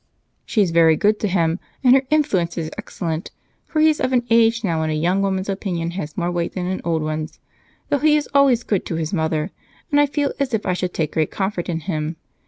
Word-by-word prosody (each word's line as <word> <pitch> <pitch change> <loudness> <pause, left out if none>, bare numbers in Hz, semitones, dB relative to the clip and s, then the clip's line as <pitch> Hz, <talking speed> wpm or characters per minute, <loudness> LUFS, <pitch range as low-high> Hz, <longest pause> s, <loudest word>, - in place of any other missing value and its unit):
"She's 200 -7 +2
very 165 -1 +5
good 210 +6 +2
to 210 - 0
him, 170 -2 +1 0.2
and 250 -1 +7
her 265 - +5
influence 195 - +1
is 160 -2 -3
excellent, 165 -1 -4 0.4
for 310 - -1
he 315 - +6
is 310 -1 +2
of 255 - +1
an 245 -1 +3
age 230 0 +4
now 170 -5 0
when 160 - -1
a - - 0
young 175 +5 +1
woman's 190 -1 -1
opinion 180 -4 -2
has 160 -4 -6
more 175 -1 0
weight 175 -1 -2
than 180 -2 -3
an 185 +1 -2
old 165 -2 0
one's. 155 0 -4 0.5
Though 285 - +2
he 305 +1 +4
is 300 -1 0
always 270 -4 +4
good 200 -5 0
to 165 - -3
his 160 +1 -3
mother, 160 0 -1 0.4
and 290 0 +5
I 290 - +3
feel 285 0 -1
as 265 -4 0
if 215 - -3
I 185 - +1
should 180 0 -3
take 155 -2 -1
great 155 -1 +1
comfort 190 -3 -3
in 165 -1 -2
him. 155 -2 -3
185 Hz, 235 wpm, -21 LUFS, 165-230 Hz, 0.5 s, and